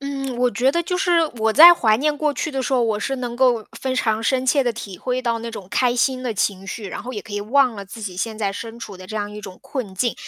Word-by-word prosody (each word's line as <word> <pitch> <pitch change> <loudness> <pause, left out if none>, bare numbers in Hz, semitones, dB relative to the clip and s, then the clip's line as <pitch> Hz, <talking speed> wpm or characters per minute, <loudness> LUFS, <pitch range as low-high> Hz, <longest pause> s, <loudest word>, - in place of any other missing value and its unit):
嗯， 275 -2 -4
我 250 0 +3
觉 245 +5 +2
得 340 +2 +1
就 360 +2 -2
是 365 -1 +1 0.3
我 220 0 +2
在 335 +8 +10
怀 220 -10 +3
念 295 +4 0
过 300 -1 0
去 305 - -2
的 270 -2 -2
时 265 - -3
候， 245 - +3
我 220 -2 0
是 270 +6 -2
能 245 -2 -4
够 245 -4 +3 0.2
非 260 -1 -2
常 220 -3 0
深 255 +2 +1
切 275 +2 +3
地 245 - +1
体 200 -5 -8
会 255 0 -2
到 235 -2 0
那 230 +1 -6
种 205 -5 -8
开 250 -1 +1
心 255 +1 +1
的 240 -4 -2
情 195 -1 -1
绪， 210 +1 -6
然 - - -6
后 250 +4 -6
也 205 - -5
可 225 - -12
以 205 - -2
忘 250 +3 +2
了 200 -1 -7
自 220 +3 -10
己 190 -3 -5
现 220 +3 -3
在 200 -3 -1
身 230 +3 -7
处 200 -4 -8
的 185 - -10
这 215 - -6
样 205 -1 -3
一 210 - -7
种 190 -3 -10
困 245 -9 -5
境， 240 +5 0
235 Hz, 315 characters per minute, -21 LUFS, 210-265 Hz, 0.3 s, 在